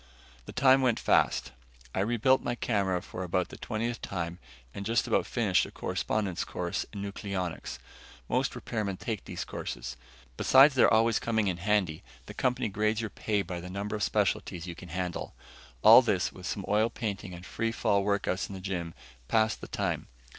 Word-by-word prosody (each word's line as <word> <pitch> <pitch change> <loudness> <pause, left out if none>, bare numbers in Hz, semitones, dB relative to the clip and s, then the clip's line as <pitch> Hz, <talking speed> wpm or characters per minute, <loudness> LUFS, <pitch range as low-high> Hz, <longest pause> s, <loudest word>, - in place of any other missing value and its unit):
The - - -6
time 130 +1 +5
went 125 -3 +2
fast. 65 - +2 0.4
I - - -1
rebuilt 120 +6 +3
my 120 - -2
camera 95 -7 0
for - - -7
about 90 0 0
the - - -9
twentieth 115 +2 -3
time 85 -2 -4 0.3
and 100 - -5
just 115 +3 +1
about - - +1
finished - - +2
a - - -12
correspondence 100 -5 -2
course - - -3
in 100 - -6
nucleonics. 100 -4 -4 0.5
Most - - 0
repairmen 105 -4 -3
take 110 -2 -4
these - - -5
courses. 60 +1 -5 0.4
Besides 135 +2 +7
their 130 - +5
always 115 0 +4
coming 110 -3 0
in 90 - -2
handy, 95 -4 +1 0.2
the - - -9
company 125 -1 0
grades 110 +2 0
your 110 -2 -3
pay 105 0 -1
by 90 -1 -5
the 90 - -8
number 100 +3 -3
of 105 - -4
specialties 85 -3 0
you 90 - -5
can 85 +1 -11
handle. 90 +1 -4 0.5
All 110 +4 +10
this, 105 -7 0
with 90 0 -8
some 100 - -3
oil 105 +3 +3
painting 100 -5 -4
and 90 +1 -10
free 115 +4 -2
fall 100 -3 +1
workouts 100 -2 0
in 100 - -6
the - - -6
gym, 90 -3 -4 0.3
passed 110 +3 +2
the - - -7
time. - - -2
100 Hz, 180 wpm, -29 LUFS, 90-115 Hz, 0.5 s, All